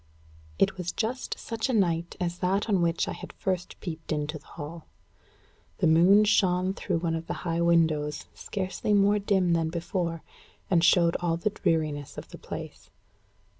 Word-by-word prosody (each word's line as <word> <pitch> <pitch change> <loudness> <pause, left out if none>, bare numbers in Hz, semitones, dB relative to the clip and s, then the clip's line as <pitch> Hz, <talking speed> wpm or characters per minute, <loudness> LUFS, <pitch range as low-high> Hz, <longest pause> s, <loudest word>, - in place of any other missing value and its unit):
It 190 - +2
was 175 -1 -2
just 240 +3 -3
such 230 +1 -3
a - - +1
night 170 -5 +1
as 175 -1 -2
that 190 +4 0
on 195 -5 +2
which 170 0 +1
I - - -2
had - - -8
first 185 -2 -3
peeped 160 -3 -6
into 150 0 -2
the - - -23
hall. 160 +1 -7 0.9
The - - +1
moon 175 +6 +6
shone 185 -2 +2
through 170 - -2
one 165 0 -1
of 165 0 -4
the 175 - -5
high 170 0 0
windows, 160 -3 +2
scarcely 195 +1 -2
more 205 +1 +4
dim 190 -3 +2
than 165 -1 +1
before, 170 0 -3 0.5
and 170 -2 +4
showed 170 -1 +5
all 170 -1 0
the 205 +5 -1
dreariness 155 -6 -1
of - - -8
the - - -11
place. - - -8
170 Hz, 170 wpm, -27 LUFS, 165-190 Hz, 0.9 s, moon